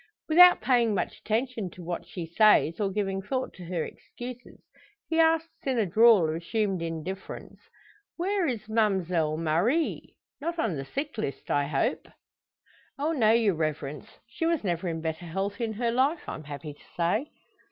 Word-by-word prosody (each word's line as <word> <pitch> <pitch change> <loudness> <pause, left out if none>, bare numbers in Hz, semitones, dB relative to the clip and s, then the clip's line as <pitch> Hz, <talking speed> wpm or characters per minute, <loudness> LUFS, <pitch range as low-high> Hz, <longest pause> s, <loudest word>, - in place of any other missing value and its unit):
Without 355 +3 +8
paying 235 -5 +3
much - - -2
attention 225 -2 -2
to 175 +1 -12
what 170 0 -5
she 175 -3 -6
says, 170 -2 +4
or 200 -2 +1
giving 195 -1 -2
thought 255 +6 -3
to 180 - -10
her 170 -2 -2
excuses, 245 0 -10 0.5
he 325 - 0
asks 325 -1 +1
in 260 -2 +1
a 220 - +2
drawl 215 -1 +6
of 155 - -1
assumed 190 +2 -1
indifference, 165 +3 -6 0.6
"Where 375 0 0
is 235 -6 -3
Ma'mselle 185 -8 +1
Marie? 175 - 0 0.2
Not 335 +4 -3
on 225 - 0
the 135 -1 -5
sick 280 - -4
list, 140 -10 -4
I 145 0 +2
hope?" 140 -2 -1 0.9
"Oh 295 +3 0
no, 240 -9 +3
your 225 -3 +3
reverence. 150 -3 -3 0.2
She 245 +8 -3
was 335 -6 +1
never 175 -2 -1
in 165 -1 -3
better 160 +1 -4
health 195 +7 -3
in 225 -2 -1
her 235 +2 0
life, 275 +7 +1
I'm 155 - -6
happy 145 +1 -7
to - - -21
say." 195 - +1
205 Hz, 170 wpm, -27 LUFS, 165-255 Hz, 0.9 s, Without